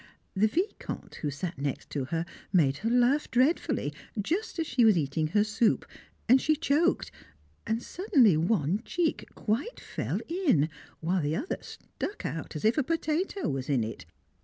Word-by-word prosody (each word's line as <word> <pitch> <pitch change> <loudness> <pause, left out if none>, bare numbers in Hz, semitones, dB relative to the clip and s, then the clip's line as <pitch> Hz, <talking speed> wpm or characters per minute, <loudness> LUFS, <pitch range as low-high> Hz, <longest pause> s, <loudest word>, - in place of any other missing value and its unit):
The 205 +3 +4
Vicomte, 360 - -3
who 150 - -1
sat 165 +4 -5
next 140 -1 -3
to 140 -3 -2
her, 165 +4 -2 0.3
made 145 -8 +3
her 225 - -1
laugh 250 +5 +3
dreadfully, 265 +7 +1 0.3
just 360 - -1
as 325 - 0
she 250 -4 +2
was 215 -5 +6
eating 155 +1 0
her 205 +6 +3
soup, 215 +1 +1 0.4
and 255 +3 +6
she 310 - +3
choked, 320 +2 +1 0.6
and 225 +1 -1
suddenly 275 - +3
one 175 +2 +1
cheek 340 +1 -1
quite 235 - -2
fell - - -3
in, 295 - +2 0.3
while 175 +3 +1
the 150 +1 0
other 290 - -3
stuck 410 - -7
out 160 -1 -4
as 150 - -3
if 225 +7 +4
a - - +2
potato 330 +6 -1
was 135 0 -3
in 130 -5 +2
it. 110 -7 -6
220 Hz, 165 wpm, -29 LUFS, -, 0.6 s, was